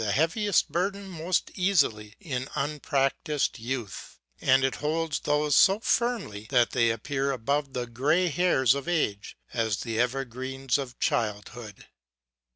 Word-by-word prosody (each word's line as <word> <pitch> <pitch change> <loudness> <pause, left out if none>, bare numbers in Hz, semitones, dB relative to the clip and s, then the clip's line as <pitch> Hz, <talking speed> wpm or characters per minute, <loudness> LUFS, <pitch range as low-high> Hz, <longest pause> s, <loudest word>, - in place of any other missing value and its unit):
371 125 +9 +2
heaviest 205 -3 +2
burdens 195 0 -2
most 175 +3 0
easily 140 - +1
in 130 -6 -4
unpractised 145 0 -1
youth, 115 -4 -5 0.2
and 130 +1 +4
it 135 - 0
holds 155 +1 -1
those 150 -1 +1
so 195 +2 +6
firmly 220 - -1
that 120 -3 +3
they 115 -2 +3
appear 135 +5 -1
above 140 +2 -1
the 125 -1 -2
gray 140 +10 +1
hairs 155 -7 +3
of 140 +2 -5
age 115 -12 -1 0.2
as 110 -5 0
the 115 -2 -3
evergreens 130 +1 -1
of 125 -3 -6
childhood. 105 0 -3
135 Hz, 135 wpm, -27 LUFS, 120-160 Hz, 0.2 s, so